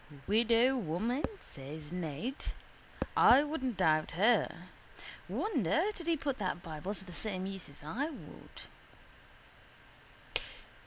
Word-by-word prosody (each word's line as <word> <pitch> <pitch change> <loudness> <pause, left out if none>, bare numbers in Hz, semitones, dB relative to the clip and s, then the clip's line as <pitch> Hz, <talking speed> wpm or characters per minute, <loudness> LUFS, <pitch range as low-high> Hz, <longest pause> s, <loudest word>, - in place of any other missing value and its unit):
—Widow 230 +4 +4
woman, 225 - -1 0.2
says 150 +4 -7
Ned. 175 - -2 0.8
I 260 +4 +8
wouldn't 265 - -2
doubt 155 -1 +3
her. 215 +9 +2 0.6
Wonder 330 - +1
did 340 -4 -9
he 335 -1 +3
put 275 -3 -2
that 185 -3 -2
bible 165 +5 -4
to 190 - -8
the 180 - -10
same 190 0 -3
use 195 -4 -5
as 140 - -14
I 255 - -1
would. 305 - -11
210 Hz, 115 wpm, -33 LUFS, 165-265 Hz, 0.8 s, I